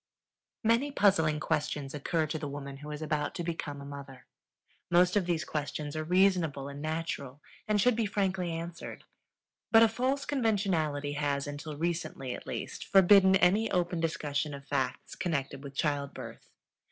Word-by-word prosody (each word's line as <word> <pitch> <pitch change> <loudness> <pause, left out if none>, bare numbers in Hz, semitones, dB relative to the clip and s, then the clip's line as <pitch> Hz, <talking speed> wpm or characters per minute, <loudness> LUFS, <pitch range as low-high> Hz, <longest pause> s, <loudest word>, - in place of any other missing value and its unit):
Many 230 +6 +3
puzzling 165 - +3
questions 150 -3 -2
occur 155 +2 0
to 155 +1 -3
the 150 - -4
woman 140 -1 -6
who 150 +2 -9
is 150 +1 -5
about 150 -1 -1
to 175 - -3
become 160 -4 -4
a 140 - -8
mother. 140 -2 -9 0.6
Most 175 +2 +4
of 195 -4 +2
these 170 -2 0
questions 150 0 -4
are 155 - -2
reasonable 175 -5 +2
and 140 0 -7
natural, 155 -4 -3 0.3
and 210 -1 +2
should 245 +3 +4
be 225 -2 0
frankly 190 -3 0
answered; 165 +1 -6 0.7
but 225 0 +8
a - - +7
false 255 +5 -1
conventionality 190 - 0
has 145 -1 -1
until 145 +1 -6
recently, 155 -6 -2
at - - -9
least - - -5
forbidden 190 0 +6
any 195 +4 +4
open 175 -1 0
discussion 150 -3 -1
of 140 0 -11
facts 130 -3 -2
connected 140 -5 -2
with 140 -1 -9
childbirth. 145 -2 -3
160 Hz, 160 wpm, -30 LUFS, 145-190 Hz, 0.7 s, but